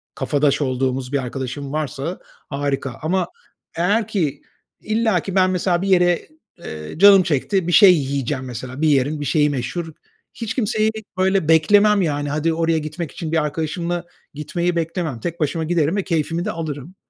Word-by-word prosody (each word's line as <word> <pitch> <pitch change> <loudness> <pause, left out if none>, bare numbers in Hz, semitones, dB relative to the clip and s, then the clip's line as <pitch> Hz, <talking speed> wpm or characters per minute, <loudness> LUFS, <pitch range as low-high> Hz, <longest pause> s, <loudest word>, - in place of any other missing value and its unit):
kafadaş 145 0 +1
olduğumuz 130 0 -1
bir - - +3
arkadaşım 135 +2 -5
varsa, 155 +2 -3 0.3
harika, 140 -2 -2
ama 175 +2 0 0.5
eğer 205 +5 +1
ki 160 -10 -1 0.4
illaki 215 -4 0
ben, 185 -1 +4
mesela, 180 -1 0
bir 195 - -2
yere, 175 -2 +3 0.3
eee, 75 - -8
canım 195 +1 +8
çekti, 170 +3 0
bir 175 - 0
şey 190 -1 +8
yiyeceğim, 140 -2 -2
mesela, 130 +3 -7
bir 160 - +3
yerin 145 +1 +2
bir - - -3
şeyi 150 +1 +2
meşhur, 150 +5 -4 0.4
hiç 225 -2 -4
kimseyi, 220 -2 +1 0.3
böyle, 190 -3 +2
beklemem, 200 +6 +5
yani, 145 -4 -1
hadi 155 +3 0
oraya 165 0 +1
gitmek 155 +1 -5
için 160 -2 -6
bir 160 -2 +2
arkadaşımla 170 +3 -3 0.3
gitmeyi 170 +4 -2
beklemem, 165 -5 -2
tek 170 +8 -5
başıma 160 +2 -1
giderim 165 0 +1
ve 200 - 0
keyfimi 165 +1 -1
de 210 - -1
alırım. 160 0 -6
160 Hz, 160 wpm, -21 LUFS, 145-180 Hz, 0.5 s, canım